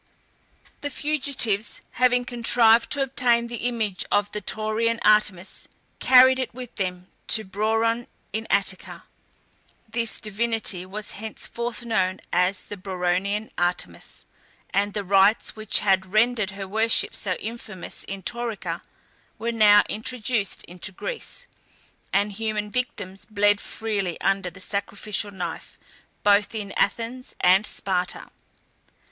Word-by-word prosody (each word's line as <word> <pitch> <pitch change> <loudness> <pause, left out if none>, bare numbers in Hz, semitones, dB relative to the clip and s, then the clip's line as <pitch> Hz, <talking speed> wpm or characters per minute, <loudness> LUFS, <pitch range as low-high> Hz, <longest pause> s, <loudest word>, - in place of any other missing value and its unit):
The 290 - -2
fugitives, 270 -8 0
having 250 0 +3
contrived 235 -1 +4
to 285 -2 +1
obtain 245 -3 +2
the 240 0 -2
image 220 -6 -1
of 205 0 +2
the 210 - -4
Taurian 220 +2 0
Artemis, 205 -3 +2 0.3
carried 260 0 +7
it 255 - -2
with 250 -2 -8
them 180 -2 -3 0.2
to 220 - +2
Brauron 225 +4 0 0.3
in 220 +1 -2
Attica. 190 -1 0 0.8
This 230 0 -2
divinity 215 -3 -1
was 210 +2 -4
henceforth 235 +3 -5
known 190 -5 0
as 180 +2 +2
the 205 - -8
Brauronian 190 +3 -1
Artemis, 175 0 -2 0.5
and 205 +1 0
the 205 - -1
rites 195 +3 +3
which 215 -1 +1
had 190 -2 +2
rendered 220 -1 +3
her 195 -1 -6
worship 220 +3 +2
so 190 - 0
infamous 215 -4 -7
in 195 -1 -6
Taurica 210 -8 -3 0.6
were 230 +1 -2
now 210 -2 +6
introduced 220 -2 -2
into 180 +2 -6
Greece, 475 - -6 0.7
and 200 +1 +2
human 210 0 -3
victims 205 -6 -3
bled 205 -1 +2
freely 200 -6 -3
under 195 -1 +1
the 185 - -14
sacrificial 200 +1 -1
knife, 190 -3 -6 0.5
both 205 +2 +4
in 205 -2 -4
Athens 235 +5 -1
and 190 +3 +5
Sparta. 180 -4 -3
210 Hz, 125 wpm, -24 LUFS, 195-230 Hz, 0.8 s, carried